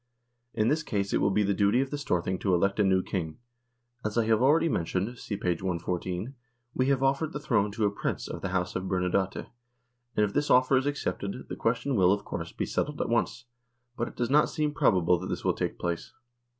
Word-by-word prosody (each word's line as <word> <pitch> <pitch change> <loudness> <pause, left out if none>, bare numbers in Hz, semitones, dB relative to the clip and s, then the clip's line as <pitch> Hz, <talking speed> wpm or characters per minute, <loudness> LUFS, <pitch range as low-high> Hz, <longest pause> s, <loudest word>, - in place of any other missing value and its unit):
In 110 -1 +2
this 155 +5 +2
case 100 -9 -2
it - - +2
will - - +3
be 105 +2 +2
the 100 0 +1
duty 100 +4 +3
of 135 0 -1
the 145 - -2
Storthing 95 -8 -1
to 95 -3 +2
elect 100 +4 +1
a - - +5
new 95 -1 +3
King. 80 -5 -3 0.7
As 110 +1 -2
I 115 - +3
have 110 0 +3
already 155 +6 +4
mentioned 95 - -1
(see 100 - -4
p. 95 - -5
114) 90 +4 -2 0.4
we 130 - +1
have 135 -1 +2
offered 140 +4 +1
the 150 - -3
throne 105 -8 +1
to 110 0 0
a 100 - +2
Prince 100 - -3
of - - -6
the 95 - -2
House 90 -1 -1
of 95 - -2
Bernadotte, 95 +1 0 0.7
and 105 - +4
if 100 - -5
this 145 0 0
offer 130 +1 +5
is 130 +2 +2
accepted, 130 -6 -3
the - - -4
question 115 +4 0
will, 95 -3 +5
of 100 0 0
course, - - -5
be - - -3
settled 150 0 -2
at - - -1
once, 120 +1 0 0.5
but 120 - -2
it - - -10
does 120 +1 -1
not 150 +1 +5
seem 150 -2 -1
probable 90 - +3
that 95 - -5
this - - -4
will - - +3
take - - -3
place. 85 -1 -3
105 Hz, 230 wpm, -28 LUFS, 95-130 Hz, 0.7 s, a